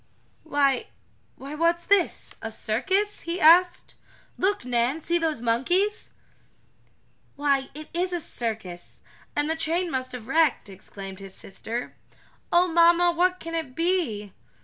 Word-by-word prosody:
"Why 280 Hz, -4 st, +1 dB, 0.5 s
why, 275 Hz, +2 st, -9 dB
what's 335 Hz, +2 st, +1 dB
this 400 Hz, -2 st, +1 dB
a 225 Hz, -, -4 dB
circus?" 380 Hz, -, 0 dB
he 340 Hz, +2 st, -4 dB
asked. 350 Hz, +3 st, +5 dB, 0.4 s
"Look, 390 Hz, -8 st, 0 dB
Nan! 245 Hz, +4 st, 0 dB
See 340 Hz, +2 st, 0 dB
those 315 Hz, -7 st, -1 dB
monkeys!" 355 Hz, -, 0 dB, 1.2 s
"Why, 275 Hz, -2 st, +1 dB
it 305 Hz, 0 st, -8 dB
is 360 Hz, +2 st, -1 dB
a 350 Hz, -, -1 dB
circus 220 Hz, -, -5 dB, 0.3 s
and 290 Hz, 0 st, +1 dB
the 320 Hz, -, 0 dB
train 330 Hz, +2 st, 0 dB
must 255 Hz, -1 st, -2 dB
have 245 Hz, -3 st, -7 dB
been 260 Hz, -, -7 dB
wrecked!" 315 Hz, -10 st, +2 dB
exclaimed 195 Hz, 0 st, -9 dB
his 195 Hz, -1 st, -10 dB
sister. 230 Hz, +5 st, -6 dB, 0.6 s
"Oh 350 Hz, +1 st, +5 dB
mamma, 340 Hz, +1 st, +5 dB
what 360 Hz, +2 st, +1 dB
can 330 Hz, 0 st, -7 dB
it 320 Hz, -6 st, -4 dB
be?" 300 Hz, -, -1 dB
315 Hz, 140 wpm, -25 LUFS, 240-345 Hz, 1.2 s, asked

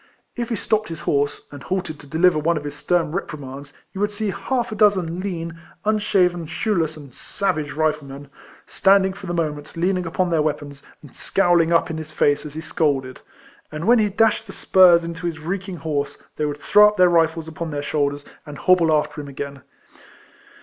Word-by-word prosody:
If 240 Hz, -1 st, -3 dB
he 230 Hz, -, 0 dB
stopped 215 Hz, 0 st, 0 dB
his 165 Hz, -2 st, -6 dB
horse, 145 Hz, -1 st, -1 dB
and 145 Hz, -1 st, -10 dB
halted 185 Hz, -4 st, -3 dB
to 145 Hz, -, -13 dB
deliver 160 Hz, +2 st, +3 dB
one 165 Hz, +2 st, +1 dB
of 150 Hz, -, -5 dB
his 145 Hz, -1 st, -5 dB
stern 170 Hz, 0 st, 0 dB
reprimands, 145 Hz, -5 st, -6 dB, 0.2 s
you 195 Hz, -, -5 dB
would 205 Hz, -, +2 dB
see 210 Hz, 0 st, -2 dB
half 240 Hz, +4 st, -2 dB
a -, -, -4 dB
dozen 190 Hz, -5 st, +2 dB
lean, 170 Hz, -4 st, -5 dB, 0.3 s
unshaven, 185 Hz, -5 st, +1 dB
shoeless, 165 Hz, -2 st, -1 dB
and 140 Hz, -4 st, -12 dB
savage 155 Hz, -5 st, -2 dB
Riflemen, 150 Hz, -3 st, -2 dB, 0.4 s
standing 190 Hz, -1 st, +3 dB
for 195 Hz, 0 st, -10 dB
the 175 Hz, -, -3 dB
moment 150 Hz, -2 st, -3 dB
leaning 180 Hz, +1 st, 0 dB
upon 180 Hz, +1 st, -1 dB
their 160 Hz, -2 st, +2 dB
weapons, 145 Hz, -2 st, -3 dB, 0.2 s
and 145 Hz, -, -15 dB
scowling 175 Hz, -3 st, +2 dB
up 165 Hz, 0 st, +2 dB
in 160 Hz, -, -4 dB
his 155 Hz, -1 st, -8 dB
face 145 Hz, 0 st, +1 dB
as 150 Hz, -, -11 dB
he 160 Hz, -, -4 dB
scolded 135 Hz, -6 st, -1 dB
•, -, -, -22 dB, 0.5 s
and 155 Hz, +2 st, -5 dB
when 240 Hz, +2 st, +5 dB
he 210 Hz, -1 st, +2 dB
dashed 220 Hz, +2 st, +2 dB
the 195 Hz, -, -9 dB
spurs 180 Hz, -3 st, +5 dB
into 170 Hz, +1 st, -5 dB
his 165 Hz, -2 st, -4 dB
reek 185 Hz, +5 st, -4 dB
ing 180 Hz, -, -6 dB
horse, 150 Hz, -3 st, -3 dB, 0.2 s
they 150 Hz, -, -1 dB
would 145 Hz, 0 st, -4 dB
throw 210 Hz, +7 st, +6 dB
up 210 Hz, -, -1 dB
their 180 Hz, 0 st, +6 dB
rifles 165 Hz, -1 st, +2 dB
upon 160 Hz, +1 st, -5 dB
their 145 Hz, -1 st, -4 dB
shoulders, 145 Hz, -1 st, -1 dB, 0.2 s
and 150 Hz, -2 st, -9 dB
hobble 175 Hz, -2 st, +3 dB
after 150 Hz, 0 st, 0 dB
him 145 Hz, -, -9 dB
again. 140 Hz, 0 st, -7 dB
165 Hz, 200 wpm, -22 LUFS, 150-190 Hz, 0.5 s, throw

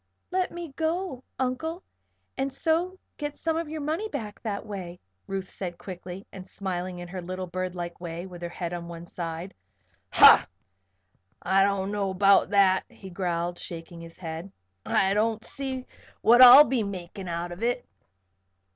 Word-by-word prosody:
"Let 370 Hz, 0 st, 0 dB
me 345 Hz, -1 st, -6 dB
go, 320 Hz, -4 st, -2 dB
Uncle, 265 Hz, +8 st, -2 dB, 0.5 s
and 270 Hz, +1 st, -1 dB
so 335 Hz, +6 st, 0 dB, 0.2 s
get 295 Hz, -1 st, -4 dB
some 325 Hz, -1 st, -1 dB
of 325 Hz, -1 st, -2 dB
your 310 Hz, 0 st, -4 dB
money 320 Hz, +9 st, -2 dB
back 210 Hz, -, -6 dB
that 210 Hz, -1 st, -4 dB
way," 185 Hz, -4 st, -7 dB, 0.3 s
Ruth 195 Hz, -1 st, -3 dB
said, 175 Hz, -2 st, -6 dB
quickly, 185 Hz, +1 st, -8 dB
and 185 Hz, -1 st, -10 dB
smiling 185 Hz, -2 st, -4 dB
in 175 Hz, 0 st, -7 dB
her 185 Hz, 0 st, -5 dB
little, 185 Hz, +1 st, -5 dB
birdlike 175 Hz, -1 st, -5 dB
way 170 Hz, 0 st, -5 dB
with 180 Hz, -2 st, -10 dB
her 175 Hz, -, -4 dB
head 175 Hz, 0 st, -5 dB
on 170 Hz, -1 st, -5 dB
one 170 Hz, 0 st, -8 dB
side. 170 Hz, +1 st, -6 dB, 0.6 s
"Ha! -, -, +9 dB, 1.0 s
I 195 Hz, 0 st, +4 dB
don't 200 Hz, 0 st, 0 dB
know 205 Hz, -2 st, -1 dB
about 195 Hz, +1 st, +4 dB
that," 195 Hz, -2 st, +4 dB
he 190 Hz, -2 st, -12 dB
growled, 175 Hz, -1 st, -2 dB
shaking 170 Hz, 0 st, -8 dB
his 165 Hz, 0 st, -11 dB
head. 165 Hz, +2 st, -6 dB, 0.4 s
"I 195 Hz, 0 st, +3 dB
don't 220 Hz, +1 st, 0 dB
see 265 Hz, -2 st, -5 dB, 0.4 s
what 240 Hz, +2 st, +6 dB
I'll 255 Hz, +3 st, +12 dB
be 255 Hz, -3 st, 0 dB
makin' 190 Hz, -2 st, -6 dB
out 170 Hz, +1 st, -3 dB
of 175 Hz, +4 st, -8 dB
it." 245 Hz, +1 st, 0 dB
195 Hz, 165 wpm, -27 LUFS, 175-255 Hz, 1.0 s, I'll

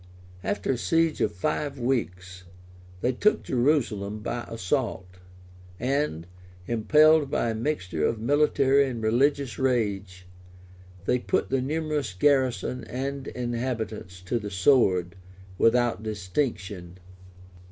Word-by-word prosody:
After 205 Hz, -, -1 dB
a 130 Hz, -, 0 dB
siege 165 Hz, +3 st, +1 dB
of 105 Hz, -, +2 dB
five 140 Hz, -, -2 dB
weeks, 90 Hz, -8 st, -3 dB, 0.6 s
they 125 Hz, -, +2 dB
took 210 Hz, -, +2 dB
Jerusalem 120 Hz, -6 st, 0 dB
by 120 Hz, +2 st, -4 dB
assault; 115 Hz, -1 st, -2 dB, 0.7 s
and, 130 Hz, -, -1 dB, 0.4 s
impelled 150 Hz, +7 st, +4 dB
by 115 Hz, -, 0 dB
a -, -, -2 dB
mixture 95 Hz, -, -1 dB
of 115 Hz, -, -2 dB
military 140 Hz, +1 st, +3 dB
and 120 Hz, -4 st, -5 dB
religious 135 Hz, +3 st, +1 dB
rage, 100 Hz, -8 st, -1 dB, 0.8 s
they 125 Hz, -, +2 dB
put -, -, -1 dB
the 135 Hz, -1 st, +2 dB
numerous 150 Hz, -5 st, -2 dB
garrison 130 Hz, 0 st, +1 dB
and 135 Hz, +2 st, -4 dB
inhabitants 115 Hz, -6 st, -4 dB
to 95 Hz, +6 st, -2 dB
the 105 Hz, -2 st, -6 dB
sword, 95 Hz, -4 st, +3 dB, 0.5 s
without 120 Hz, -1 st, +3 dB
distinction. 95 Hz, -4 st, -3 dB
120 Hz, 110 wpm, -26 LUFS, 100-140 Hz, 0.8 s, impelled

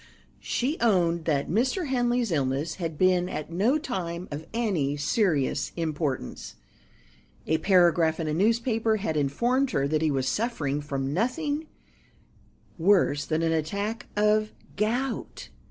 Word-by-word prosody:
She 280 Hz, +7 st, -2 dB
owned 170 Hz, -7 st, +2 dB
that 145 Hz, -4 st, 0 dB
Mr. 255 Hz, -, 0 dB
Henley's 245 Hz, -3 st, +1 dB
illness 140 Hz, 0 st, -1 dB
had 165 Hz, -2 st, -3 dB
been 180 Hz, 0 st, +3 dB
at 155 Hz, -1 st, -5 dB
no 215 Hz, -, +2 dB
time 185 Hz, -, -4 dB
of 150 Hz, +2 st, -6 dB
any 185 Hz, -12 st, 0 dB
serious 145 Hz, -, +1 dB
importance. 155 Hz, -, -3 dB, 0.9 s
A 160 Hz, 0 st, +1 dB
paragraph 170 Hz, -3 st, +3 dB
in 160 Hz, -, -2 dB
a 150 Hz, -, -1 dB
newspaper 225 Hz, +4 st, +2 dB
had 195 Hz, -7 st, -2 dB
informed 235 Hz, -, +1 dB
her 140 Hz, -, 0 dB
that 155 Hz, +1 st, 0 dB
he 160 Hz, -, +2 dB
was 135 Hz, -2 st, 0 dB
suffering 150 Hz, -, -1 dB
from 140 Hz, -1 st, -3 dB
nothing 290 Hz, -, -1 dB, 1.1 s
worse 165 Hz, -6 st, +3 dB
than 160 Hz, +1 st, 0 dB
an 165 Hz, -, +2 dB
attack 200 Hz, +9 st, -2 dB
of 215 Hz, +1 st, +2 dB, 0.2 s
gout. 235 Hz, +5 st, -2 dB
175 Hz, 135 wpm, -26 LUFS, 155-230 Hz, 1.1 s, been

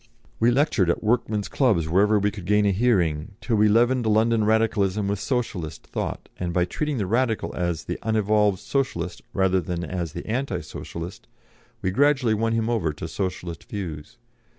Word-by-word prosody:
We 115 Hz, -, +4 dB
lectured 120 Hz, -, +2 dB
at 85 Hz, -, 0 dB
workmen's 110 Hz, -2 st, +1 dB
clubs 105 Hz, -, +2 dB
wherever 100 Hz, +6 st, +4 dB
we 105 Hz, 0 st, +1 dB
could 100 Hz, -4 st, -9 dB
gain 105 Hz, +1 st, +3 dB
a 100 Hz, -, +4 dB
hearing, 95 Hz, -6 st, +1 dB
till 115 Hz, -, -1 dB
we 105 Hz, +1 st, +5 dB
leavened 120 Hz, +2 st, +3 dB
London 110 Hz, +1 st, +3 dB
Radicalism 105 Hz, -2 st, +2 dB
with 100 Hz, -1 st, -1 dB
Socialist 100 Hz, -, -3 dB
thought, -, -, -4 dB
and 90 Hz, -1 st, -2 dB
by 90 Hz, 0 st, +2 dB
treating 150 Hz, +9 st, -2 dB
the 105 Hz, -, 0 dB
Radical 115 Hz, +2 st, 0 dB
as 85 Hz, -3 st, -1 dB
the -, -, -4 dB
unevolved 105 Hz, -2 st, +2 dB
Socialist 135 Hz, +7 st, -2 dB
rather 95 Hz, -1 st, +2 dB
than 85 Hz, +1 st, -4 dB
as 85 Hz, -1 st, -4 dB
the -, -, -6 dB
anti 115 Hz, -5 st, -2 dB
Socialist, 85 Hz, +3 st, -8 dB, 0.6 s
we 95 Hz, -, +1 dB
gradually 135 Hz, 0 st, +3 dB
won 115 Hz, +1 st, 0 dB
him 115 Hz, -1 st, 0 dB
over 110 Hz, -10 st, 0 dB
to 80 Hz, +2 st, -6 dB
Socialist 85 Hz, -2 st, -4 dB
views. 85 Hz, 0 st, -6 dB
105 Hz, 175 wpm, -24 LUFS, 90-115 Hz, 0.6 s, we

